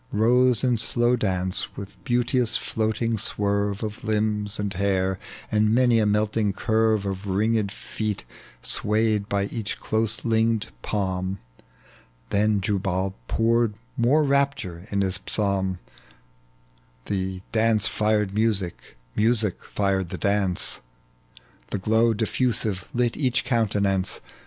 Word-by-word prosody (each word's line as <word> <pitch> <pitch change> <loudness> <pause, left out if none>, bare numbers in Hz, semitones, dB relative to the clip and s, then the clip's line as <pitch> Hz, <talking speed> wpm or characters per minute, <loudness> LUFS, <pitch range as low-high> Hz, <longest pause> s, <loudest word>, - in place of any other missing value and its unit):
Rose 120 +3 +3
in 125 -3 +2
slow 120 +2 +3
dance, 95 -4 -1
with 100 0 -9
beanteous 120 0 +1
floating 110 0 -1
swerve 100 0 -1
Of 110 0 -5
limbs 105 -1 -1
and 100 -1 -2
hair, 95 0 0 0.3
and 110 +1 +3
many 120 -2 +4
a 105 - +2
melting 105 0 +1
curve 110 -1 +1
Of 100 +1 -4
ringed 105 +1 +1
feet 105 -1 -4 0.4
swayed 105 -1 0
by 100 -1 +1
each 105 +1 -4
close 110 0 +1
linked 115 -1 +1
palm: 95 - -2 0.9
Then 105 0 +2
Jubal 95 -1 -1
poured 115 -1 +2 0.2
more 135 +5 +3
rapture 135 - 0
in 100 -1 0
his 95 0 -1
psalm, 95 -3 0 1.3
The 95 -2 -3
dance 110 -1 +3
fired 105 -2 +1
mnsie, 105 -4 +2 0.4
music 110 -3 +1
fired 95 -3 -1
the - - -4
dance. 100 -3 0 0.9
The - - -2
glow 110 +4 +2
difi'usive 110 -3 0
lit 120 -1 0
each 130 -3 +1
countenance. 100 -5 +1
105 Hz, 120 wpm, -25 LUFS, 100-115 Hz, 1.3 s, many